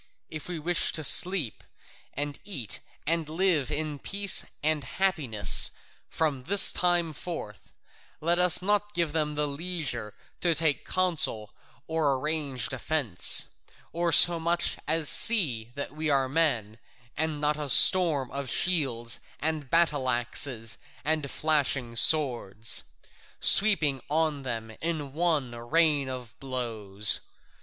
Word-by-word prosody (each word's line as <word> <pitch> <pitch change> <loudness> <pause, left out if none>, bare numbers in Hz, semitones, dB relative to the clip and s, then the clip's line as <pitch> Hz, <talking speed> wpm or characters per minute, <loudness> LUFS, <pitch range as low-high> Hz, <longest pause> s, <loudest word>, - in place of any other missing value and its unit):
If 155 +1 -7
we 175 - -6
wish 170 +3 0
to 155 - -3
sleep 175 - +2 0.5
and 145 +1 -5
eat 140 - -4 0.3
and 165 0 -1
live 165 -4 -1
in 150 -1 -4
peace 200 +3 +2 0.2
and 155 -1 0
happiness 135 - +2 0.4
from 140 -5 -3
this 200 +2 +7
time 175 -2 -1
forth, 140 - -9 0.5
let 170 +3 -1
us 180 0 +3
not 205 +1 -2
give 170 -3 -2
them 150 -2 -3
leisure 145 - -4 0.2
to 170 -2 0
take 155 -3 -1
counsel 165 - 0 0.3
or 160 -4 -1
arrange 140 -4 -3
defence, 130 - +1 0.5
or 170 0 -2
so 170 +1 +6
much 170 +1 -1
as 160 0 +1
see 130 - +3
that 140 - -6
we 155 0 -4
are 135 -2 0
men, 125 -8 -2 0.4
and 160 -1 -3
not 150 0 -1
a 145 -2 -6
storm 155 -4 +5
of 140 -1 -6
shields 125 -9 0 0.2
and 155 -3 -2
battle 150 -5 0
axes 120 -1 +2 0.3
and 155 -2 -2
flashing 140 -6 -1
swords, 120 -7 +2 0.5
sweeping 155 -11 +4
on 155 -1 -2
them 115 -4 -7
in 155 -4 -5
one 155 -6 -2
rain 145 +3 -1
of 125 -3 -9
blows. 110 -6 +2
150 Hz, 125 wpm, -26 LUFS, 130-165 Hz, 0.5 s, this